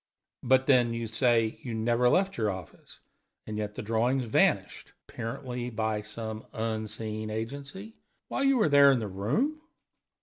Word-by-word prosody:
"But, 130 +1 +3
then, 125 -4 +3
you 115 0 -3
say 115 0 +2
you 120 -3 -5
never 120 +2 +2
left 190 +7 +2
your 110 -2 0
office, 95 -4 -9 0.5
and 110 - -5
yet 105 0 -4
the - - -5
drawings 120 +4 +1
vanished 110 - +1
apparently 125 +2 -5
by 110 -2 -1
some 110 +1 -6
unseen 110 -1 -4
agency 140 - -6 0.3
while - - -2
you 275 -1 +4
were 215 - +3
there 140 -1 +7
in 135 - +3
the 110 -3 -3
room?" 145 - -1
115 Hz, 155 wpm, -28 LUFS, 110-130 Hz, 0.5 s, there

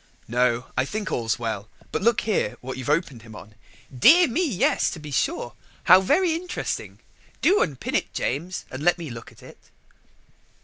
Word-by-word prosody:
"No, 120 0 +1
I 130 - +2
think 210 +8 -4
all's 115 -2 -1
well: 110 -3 -4 0.2
but - - -2
look 235 +3 +3
here 210 - -1
what 130 +1 -6
you've 130 +1 -6
opened 150 -6 0
him 110 -1 -13
on." 105 +1 -12 0.4
"Dear 325 - +7
me, 285 +9 0
yes, 245 - +1
to 165 - -7
be 150 -1 -9
sure! 120 -2 -1 0.3
how 185 +2 +7
very 345 - +2
interesting. 355 +2 -4 0.4
Do 395 +4 +4
unpin 140 -6 -2
it, - - 0
James, 165 +9 -3
and 130 - -6
let 175 +3 +3
me 165 -6 -7
look 115 -1 -9
at - - -19
it." - - -14
150 Hz, 180 wpm, -24 LUFS, -, 0.4 s, Dear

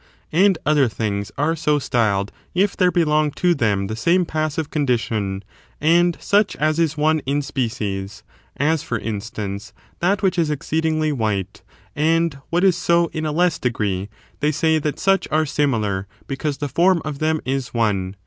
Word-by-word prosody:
And 185 +3 +4
other 145 -3 +4
things 100 -3 -3
are 150 +4 +1
so 150 -2 +1
styled 110 -7 0 0.2
if 195 +3 +2
there 180 -1 +3
belong 155 -3 +2
to 180 -1 +2
them 105 -9 0
the 110 +3 -4
same 170 +10 +2
passive 155 -1 -2
condition, 110 -8 -1 0.4
and 170 +2 +3
such 205 0 +2
as 155 +1 0
is 160 -2 +1
one 155 +1 +2
in 145 +1 0
species; 105 -7 -3 0.3
as, 155 +2 +1
for 115 - -3
instance, 105 -2 -5 0.3
that 190 +4 +1
which 185 -2 +2
is 160 -2 +2
exceedingly 155 +1 0
white, 105 -6 -2 0.3
and 165 -1 +1
what 175 +2 +1
is 190 -3 +5
so 170 -1 +2
in 155 0 -2
a - - -1
less 175 +1 +1
degree, 105 -5 -1 0.3
they 150 +1 +2
say 160 +1 +2
that 150 -1 -2
such 195 0 +2
are 155 +1 +2
similar 110 -10 0 0.2
because 140 +1 -3
the 145 - -3
form 175 +4 +2
of 145 -2 -4
them 155 0 +1
is 135 0 -2
one. 100 -5 0
150 Hz, 170 wpm, -21 LUFS, 110-165 Hz, 0.4 s, is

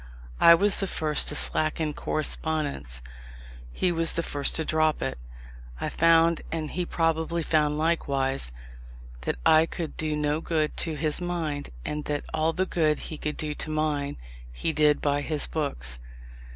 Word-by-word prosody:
I 170 - +8
was 200 +4 +1
the 195 - 0
first 155 -4 +4
to - - +2
slacken 155 0 +3
correspondence; 145 - -2 0.7
he 180 - 0
was 165 -1 0
the 170 - -1
first 145 -3 0
to 160 - +3
drop 155 0 +1
it. - - -3 0.6
I - - -2
found, 165 0 +3
and 155 -2 -3
he 180 -1 -3
probably 165 0 0
found 150 -1 +1
likewise, 140 - +1 0.7
that 65 - -2
I 160 +1 +5
could 165 -2 -6
do 155 -1 -1
no 150 +1 -1
good 155 -3 -1
to 160 -2 -1
his 155 +2 -1
mind, 165 -5 -3 0.2
and 150 0 -4
that 145 -1 -3
all 160 +1 +1
the 185 +3 -1
good 155 -4 +1
he 155 - -7
could 150 - -4
do 150 -1 -3
to 155 - -4
mine, 150 -2 -1 0.3
he - - -2
did 150 -1 +3
by 145 0 +1
his 150 0 -1
books. 60 - -1
155 Hz, 165 wpm, -26 LUFS, 150-165 Hz, 0.7 s, I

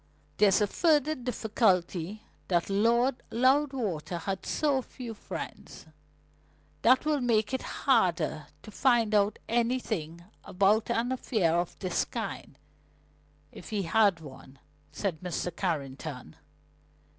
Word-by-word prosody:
"There's 200 -2 +5
the 210 - +3
further 305 - +2
difficulty 215 - 0 0.2
that 175 +1 0
Lord 235 +5 +2
Loudwater 255 - +1
had 190 +3 -4
so 285 -3 +1
few 245 -2 -8
friends. 210 - -8 1.0
That 255 +5 +4
will 300 -2 +1
make 225 -1 +1
it 260 - -1 0.2
harder - - +2 0.2
to 215 - -11
find 235 -2 +2
out 205 0 +3
anything 225 -9 -1 0.2
about 200 +3 +2
an 235 +1 0
affair 215 -10 +1
of 175 0 -2
this 185 -2 -1
kind - - -6 0.9
if - - -11
he 210 -3 -1
had 195 -1 +3
one," 135 -2 -12 0.3
said 185 -6 -3
Mr. 180 -1 -4
Carrington. 140 -5 -4
215 Hz, 115 wpm, -29 LUFS, 180-245 Hz, 1.0 s, There's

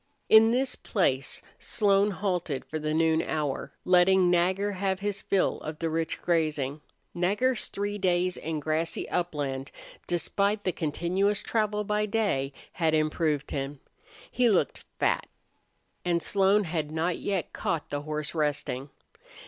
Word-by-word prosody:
In 220 0 +8
this 255 +2 +1
place 135 - 0 0.2
Slone 200 -1 +3
halted 180 -7 -2
for 155 - -4
the 155 0 -2
noon 160 0 +3
hour, 150 -3 -2
letting 180 0 +5
Nagger 185 +4 +2
have 190 -1 -1
his 205 0 -2
fill 195 - +1
of 155 0 -6
the 165 0 -2
rich 165 0 -1
grazing. 155 -4 0 0.3
Nagger's 205 +8 +1
three 205 +1 -3
days 180 -1 +1
in 160 0 -3
grassy 155 +2 -1
upland, 145 -6 -2 0.4
despite 200 +5 0
the 185 - +1
continuous 180 +6 0
travel 210 -2 0
by 210 +1 0
day, 200 -11 0 0.2
had 160 -2 +1
improved 155 -1 0
him. 135 0 -3 0.5
He 245 -2 +3
looked 205 - +1
fat, - - +1 0.8
and 170 -2 +1
Slone 200 +3 +3
had 160 -4 -2
not 165 +2 -1
yet 195 -4 -2
caught 160 -3 -2
the 145 0 -2
horse 150 -1 -4
resting. 145 -3 -1
175 Hz, 140 wpm, -28 LUFS, 155-200 Hz, 0.8 s, In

